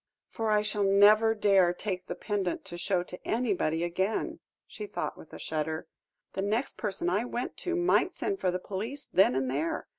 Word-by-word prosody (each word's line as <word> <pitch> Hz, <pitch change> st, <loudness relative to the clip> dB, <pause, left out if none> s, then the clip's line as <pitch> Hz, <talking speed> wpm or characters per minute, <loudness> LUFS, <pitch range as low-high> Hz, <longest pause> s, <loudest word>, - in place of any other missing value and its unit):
"For 225 Hz, -1 st, -2 dB
I 210 Hz, 0 st, +3 dB
shall 210 Hz, -1 st, -1 dB
never 210 Hz, +3 st, +6 dB
dare 195 Hz, -4 st, +4 dB
take 185 Hz, -2 st, -4 dB
the -, -, -4 dB
pendant 200 Hz, -4 st, -2 dB
to 175 Hz, -, -8 dB
show 180 Hz, 0 st, 0 dB
to 180 Hz, 0 st, -10 dB
anybody 195 Hz, -9 st, 0 dB
again," 190 Hz, +5 st, -1 dB, 0.3 s
she 420 Hz, -, -8 dB
thought, -, -, -3 dB
with -, -, -14 dB
a -, -, -8 dB
shudder. 155 Hz, +1 st, -3 dB, 0.5 s
"The 195 Hz, -, -2 dB
next 215 Hz, +6 st, -1 dB
person 195 Hz, -5 st, -2 dB
I 195 Hz, +5 st, +2 dB
went 245 Hz, 0 st, -4 dB
to 355 Hz, -1 st, -2 dB
might 350 Hz, 0 st, +2 dB
send 395 Hz, -1 st, -2 dB
for -, -, +1 dB
the 180 Hz, -, 0 dB
police 215 Hz, +10 st, -5 dB
then 190 Hz, -8 st, +4 dB
and 130 Hz, 0 st, 0 dB
there. 145 Hz, +6 st, -1 dB
200 Hz, 190 wpm, -29 LUFS, 175-220 Hz, 0.5 s, never